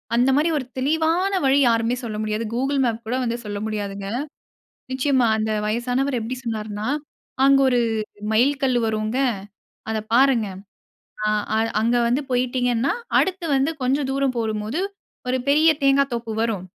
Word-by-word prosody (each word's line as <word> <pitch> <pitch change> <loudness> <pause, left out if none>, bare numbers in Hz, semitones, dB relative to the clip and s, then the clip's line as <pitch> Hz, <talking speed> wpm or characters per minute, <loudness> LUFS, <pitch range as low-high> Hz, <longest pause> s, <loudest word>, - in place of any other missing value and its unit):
அந்த 245 +3 +3
மாரி 310 +3 +2
ஒரு 260 - -3
தெளிவான 320 +7 +1
வழி 270 +1 +4
யாருமே 230 +1 +2
சொல்ல 215 -2 -4
முடியாது. 215 +1 -2
கூகிள் 270 +3 0
மேப் 230 -2 -2
கூட 240 - -1
வந்து 235 -1 -1
சொல்ல 205 -1 -4
முடியாதுங்க. 200 -2 -4 0.8
நிச்சயமா 260 -1 +2
அந்த 220 0 -1 0.2
வயசானவர் 245 +4 0
எப்படி 230 +3 -4
சொன்னார்ன்னா, 215 -2 -4 0.6
அங்க 275 0 +6
1 245 -1 +2 0.5
மைல் 250 +6 +4
கல்லு 255 -3 +2
வருங்க, 215 +2 -1 0.7
அத 220 - -1 0.2
பாருங்க. 250 -4 +4 0.8
ஆ, - - +2 0.3
அ - - +2 0.2
அங்க 235 +2 +2
வந்து 245 +5 +1
போயிட்டீங்கன்னா, 245 0 +1 0.3
அடுத்து 370 -2 0
வந்து 270 +4 +2
கொஞ்சம் 270 +2 +1
தூரம் 270 -2 0
போகும் 220 -2 -1
போது, 245 +10 -2 0.5
1 255 +1 +1
பெரிய 310 +3 +5
தேங்கா 275 0 +5
தோப்பு 230 -1 -4
வரும். 210 -6 -2
245 Hz, 150 wpm, -22 LUFS, 220-275 Hz, 0.8 s, அங்க